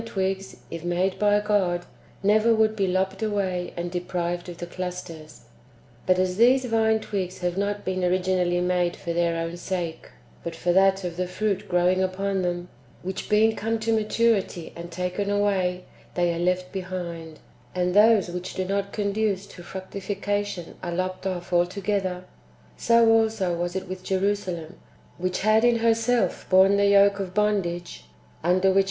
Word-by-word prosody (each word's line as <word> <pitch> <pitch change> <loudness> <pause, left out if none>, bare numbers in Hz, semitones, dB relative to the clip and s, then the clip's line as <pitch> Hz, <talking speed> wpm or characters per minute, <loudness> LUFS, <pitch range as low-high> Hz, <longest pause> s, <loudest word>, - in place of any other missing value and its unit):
twigs, 195 -3 -2 0.2
if 165 0 -6
made 180 +2 0
by 205 0 +4
God, 195 -4 0 0.4
never 215 +3 +4
would 220 0 +2
be 195 -3 0
lopped 190 +2 -1
away 190 -4 -1
and 175 0 -3
deprived 175 -1 -3
of 175 - -8
the 175 - -5
clusters. 175 -3 -7 0.7
But 185 0 +4
as 185 0 0
these 255 +3 +5
[vine 220 -2 +2
twigs] 190 -3 -3
have 175 -1 -1
not 205 +1 -2
been 185 0 -1
originally 180 -1 +1
made 180 -1 +1
for 170 - -4
their 170 0 +1
own 165 +1 -3
sake, 175 -3 -4 0.3
but 170 -1 -5
for 175 +1 0
that 195 +1 +4
of 175 -1 -4
the 180 0 -1
fruit 200 +2 -2
growing 180 +1 +3
upon 190 +1 -1
them, 175 0 -2 0.3
which 190 +1 -5
being 220 +1 +4
come 225 +2 -1
to 225 +1 +1
maturity 215 -5 0
and 170 0 -8
taken 180 +3 -3
away, 190 -3 +1 0.3
they 175 -1 +2
are 165 - -4
left 180 +1 0
behind, 175 -4 -6 0.4
and 180 0 0
those 210 -1 +5
wdiich 180 +1 -6
do 185 - -1
not 200 +1 -2
conduce 205 -1 -1
to 180 - -12
fructification 195 0 -4
are 175 -1 -4
lopped 185 +1 -2
off 180 -2 -4
altogether; 185 +1 0 0.5
so 230 0 +4
also 220 -5 +3
[was 175 +1 -3
it 190 0 -3
with] 185 0 -7
Jerusalem, 190 -3 -2 0.4
which 185 +1 -1
had 215 +2 +4
in 240 -1 +5
herself 230 +1 +1
borne 190 +1 +6
the 200 0 +4
yoke 200 0 +5
of 185 -2 -5
bondage 180 - -1 0.4
(under 185 +3 +3
which 190 - +1
m. - - +7
185 Hz, 165 wpm, -25 LUFS, 175-205 Hz, 0.7 s, m